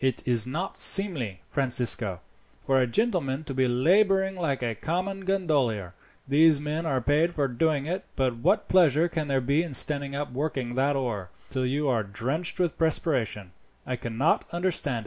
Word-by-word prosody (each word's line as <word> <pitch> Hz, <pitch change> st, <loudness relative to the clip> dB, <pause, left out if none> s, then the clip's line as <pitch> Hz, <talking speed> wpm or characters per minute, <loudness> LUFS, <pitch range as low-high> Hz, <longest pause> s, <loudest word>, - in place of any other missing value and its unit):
"It 130 Hz, -2 st, 0 dB
is 120 Hz, -2 st, +2 dB
not 170 Hz, +9 st, -4 dB
seemly, 135 Hz, -, +1 dB
Francisco, 120 Hz, -8 st, +2 dB, 0.4 s
for 135 Hz, -1 st, +2 dB
a 125 Hz, -, +1 dB
gentleman 160 Hz, -, 0 dB
to 145 Hz, -, -6 dB
be 130 Hz, 0 st, +1 dB
labouring 190 Hz, +9 st, +2 dB
like 145 Hz, -8 st, -2 dB
a 115 Hz, -1 st, -1 dB
common 185 Hz, -, -3 dB
gondolier. 140 Hz, -, 0 dB, 0.3 s
These 150 Hz, +2 st, +5 dB
men 155 Hz, +3 st, -3 dB
are 135 Hz, -4 st, +1 dB
paid 150 Hz, +7 st, +1 dB
for 145 Hz, -2 st, +1 dB
doing 140 Hz, +3 st, 0 dB
it; 185 Hz, +4 st, -3 dB
but 130 Hz, -3 st, 0 dB
what 115 Hz, -, +1 dB
pleasure 160 Hz, -5 st, +4 dB
there 145 Hz, -6 st, -1 dB
can -, -, -8 dB
be 140 Hz, +4 st, +2 dB
in 170 Hz, -4 st, -5 dB
standing 140 Hz, 0 st, +1 dB
up 145 Hz, -1 st, -4 dB
working 130 Hz, -2 st, -3 dB
that 135 Hz, +3 st, +1 dB
oar, 110 Hz, -9 st, -3 dB, 0.2 s
till 130 Hz, -1 st, -1 dB
you 145 Hz, +3 st, -1 dB
are 120 Hz, -4 st, +2 dB
drenched 130 Hz, -, -3 dB
with 175 Hz, -3 st, -1 dB
perspiration, 125 Hz, -, 0 dB, 0.3 s
I 130 Hz, -, -2 dB
cannot 120 Hz, +5 st, 0 dB
understand. 170 Hz, -8 st, -1 dB
140 Hz, 170 wpm, -26 LUFS, 125-165 Hz, 0.4 s, These